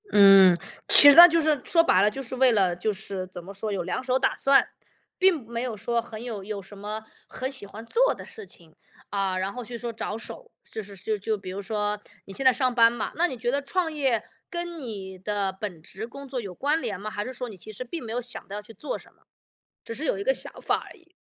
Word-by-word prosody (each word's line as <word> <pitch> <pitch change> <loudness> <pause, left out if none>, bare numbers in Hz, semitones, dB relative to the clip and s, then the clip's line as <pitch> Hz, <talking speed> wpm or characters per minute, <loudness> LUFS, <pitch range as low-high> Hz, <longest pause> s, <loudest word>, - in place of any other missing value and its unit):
嗯， 195 -3 +7 0.3
其 290 - +11
实 285 - +8
那 345 - +13
就 335 -1 +2
是 305 -4 +1
说 330 -1 +3
白 185 - +4
了 205 - +4
就 270 - -6
是 260 0 -6
为 255 0 +4
了 190 -5 +2
就 195 +5 -1
是 190 -1 -6
怎 180 -1 -9
么 195 +3 -10
说， 210 +2 -5
有 190 -3 -2
两 180 +8 -3
手 255 0 +1
打 - - +1
算。 275 0 +4 0.5
并 365 -9 +3
没 235 0 -4
有 245 -4 -3
说 235 +3 -1
很 225 -1 -9
有 220 -5 -6
有 205 0 -5
什 195 +2 -13
么 210 +2 -6 0.2
很 260 +1 -4
喜 260 -7 -6
欢 215 +3 -10
做 - - +2
的 - - -10
事 440 - -11
情， 170 - -14 0.4
啊， 195 -2 -1
然 190 +1 -2
后 250 - -6
去 235 +1 -7
说 235 0 -5
着手， 225 - -7 0.2
就 220 - -5
是 200 -1 -12
就 215 +3 -2
就 210 +2 -2
比 190 -2 -8
如 195 +2 -5
说 210 0 -2 0.2
你 195 - -10
现 270 - -4
在 260 - +7
上 255 0 0
班 230 -1 +5
嘛， 240 -2 -4
那 345 +3 +2
你 260 - -5
觉 240 +1 -1
得 280 +2 0
创 325 +3 -2
业 265 -7 0 0.3
跟 345 -1 -5
你 195 -8 -7
的 200 0 -2
本 190 -4 -6
职 195 +7 -8
工 275 +3 -10
作 255 -2 -4
有 195 -5 -8
关 295 - 0
联 210 -7 -4
吗？ 205 - -7
还 205 - -3
是 255 - -6
说 250 0 -6
你 210 - -10
其 190 +4 -10
实 215 +4 -6
并 290 +4 -7
没 225 - -7
有 240 - -1
想 245 0 -8
到 200 - -7
要 210 - -5
去 225 - -13
做 225 +9 -5
什 - - -17
么， - - -34 0.6
只 - - -8
是 280 +7 -5
有 275 - 0
一 195 - -4
个 265 - +2
想 - - -5
法 - - +2
而 - - -14
已。 340 -1 -25
225 Hz, 285 characters per minute, -25 LUFS, 200-265 Hz, 0.6 s, 那